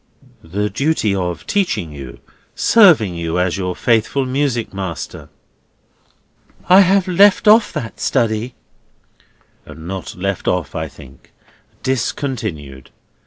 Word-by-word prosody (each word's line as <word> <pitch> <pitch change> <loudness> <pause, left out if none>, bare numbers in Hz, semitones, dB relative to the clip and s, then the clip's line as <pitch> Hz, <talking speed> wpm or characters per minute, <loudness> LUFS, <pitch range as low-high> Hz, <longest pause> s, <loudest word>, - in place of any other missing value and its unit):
"The 100 +6 -2
duty 135 -4 0
of 90 -3 -3
teaching 175 - -1
you, 70 -4 -10 0.3
serving 165 - +5
you 85 0 -3
as 90 -1 0
your 90 -2 -3
faithful 115 +6 +1
music 130 -4 -1
master." 95 -5 -6 1.4
"I 185 +2 +7
have 195 0 +3
left 195 +3 +4
off 215 +1 +6
that 110 -4 -6
study." 115 +1 -1 1.1
"Not 85 +2 -7
left 100 +1 -3
off, 85 -7 -1
I - - -3
think. 65 -1 -16 0.5
Discontinued. 110 - -3
105 Hz, 110 wpm, -18 LUFS, 85-140 Hz, 1.4 s, I